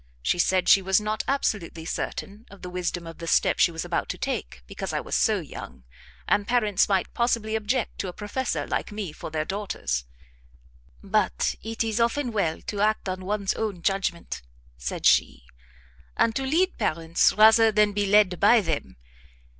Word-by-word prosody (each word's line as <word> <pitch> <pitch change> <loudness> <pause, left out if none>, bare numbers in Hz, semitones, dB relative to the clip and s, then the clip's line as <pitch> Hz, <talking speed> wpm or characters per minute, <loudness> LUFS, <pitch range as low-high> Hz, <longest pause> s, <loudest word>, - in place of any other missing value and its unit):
She 175 - +1
said 185 +1 +2
she 195 - +7
was 190 +1 +3
not 215 0 -2
absolutely 200 -11 -1
certain 205 +6 -5
of 200 - -15
the 180 - -6
wisdom 175 -1 -3
of 165 0 -10
the 165 - -6
step - - +2
she - - +5
was 165 -1 -5
about - - -2
to - - -3
take, - - -4
because - - -6
I - - 0
was - - -4
so - - +2
young, 65 - -9 0.4
and 205 0 +1
parents 215 -5 +2
might 195 -2 0
possibly 230 -2 0
object 220 +2 -1
to 195 - -2
a - - -4
professor 215 +6 -3
like - - -3
me 205 -5 -5
for 155 - -8
their 155 0 -2
daughters: 190 - -3 1.0
"But - - +1
it 225 0 -3
is 225 0 -2
often 235 +2 +1
well 185 -7 -1
to 205 -1 -4
act 215 -1 +1
on 185 0 -4
one's 200 0 -1
own 200 -6 -4
judgment," 195 -3 -1 0.3
said 60 0 -5
she, 60 -3 +3 0.7
"and 225 -1 +2
to 270 0 -1
lead 360 +7 +1
parents, 165 +1 +2
rather 220 +1 +6
than 210 -1 +3
be 205 0 0
led 195 -3 +4
by 220 +3 +6
them. 160 - -4
200 Hz, 180 wpm, -25 LUFS, 175-220 Hz, 1.0 s, she